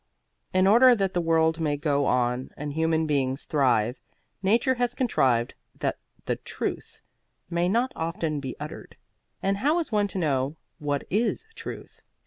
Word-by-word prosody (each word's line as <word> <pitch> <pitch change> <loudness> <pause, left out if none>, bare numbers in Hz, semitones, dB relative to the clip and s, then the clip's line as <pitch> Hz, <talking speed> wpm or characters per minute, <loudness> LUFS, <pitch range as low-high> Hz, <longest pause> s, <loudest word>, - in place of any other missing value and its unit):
In 185 0 +3
order 240 +5 +7
that 195 -3 0
the 175 - +1
world 160 0 +2
may 150 -2 0
go 145 -1 +1
on 125 +1 +1
and 145 0 -4
human 160 +1 +1
beings 135 -2 0
thrive, 125 -5 +2 0.4
nature 230 +7 +3
has 245 -1 -1
contrived 130 - +2 0.2
that - - -2 0.3
the - - -1
Truth - - -5 0.5
may 170 +1 +1
not 240 +6 +1
often 165 -2 -2
be 130 -2 -5
uttered. - - -8 0.5
And 195 +1 +1
how 295 +10 +2
is 335 -6 -2
one 205 -1 +2
to 195 - -6
know 140 -4 0 0.2
what 145 -1 -1
is 220 - 0
Truth? - - -9
160 Hz, 155 wpm, -26 LUFS, 140-205 Hz, 0.5 s, order